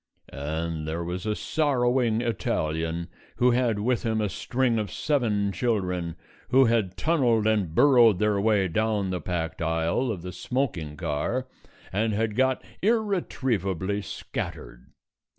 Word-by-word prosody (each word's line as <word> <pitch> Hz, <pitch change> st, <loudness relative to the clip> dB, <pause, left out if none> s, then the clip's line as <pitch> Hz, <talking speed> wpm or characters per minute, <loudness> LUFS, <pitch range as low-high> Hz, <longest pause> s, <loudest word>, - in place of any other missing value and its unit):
And 80 Hz, +2 st, -3 dB
there 80 Hz, +2 st, -2 dB
was 90 Hz, +4 st, -4 dB
a 105 Hz, -, 0 dB
sorrowing 125 Hz, -6 st, +1 dB
Italian 85 Hz, -7 st, -1 dB, 0.3 s
who 125 Hz, 0 st, +4 dB
had 120 Hz, -3 st, +2 dB
with 120 Hz, +4 st, 0 dB
him 110 Hz, -2 st, 0 dB
a 105 Hz, -2 st, 0 dB
string 120 Hz, +4 st, 0 dB
of 105 Hz, -2 st, -3 dB
seven 110 Hz, -9 st, 0 dB
children 90 Hz, -7 st, -1 dB, 0.3 s
who 135 Hz, +1 st, +6 dB
had 110 Hz, -6 st, +1 dB
tunnelled 125 Hz, -9 st, +2 dB
and 105 Hz, -7 st, +1 dB
burrowed 120 Hz, -7 st, +6 dB
their 105 Hz, 0 st, +1 dB
way 105 Hz, -3 st, +3 dB
down 105 Hz, +1 st, 0 dB
the 90 Hz, -2 st, -2 dB
packed 80 Hz, -1 st, -3 dB
aisle 80 Hz, +9 st, 0 dB
of 90 Hz, -6 st, -5 dB
the 90 Hz, -, -5 dB
smoking 90 Hz, -, -3 dB
car 115 Hz, -, -2 dB, 0.5 s
and 110 Hz, +3 st, +1 dB
had 110 Hz, 0 st, -1 dB
got 130 Hz, +1 st, +2 dB, 0.2 s
irretrievably 125 Hz, -, 0 dB
scattered. -, -, -6 dB
105 Hz, 135 wpm, -26 LUFS, 90-120 Hz, 0.5 s, who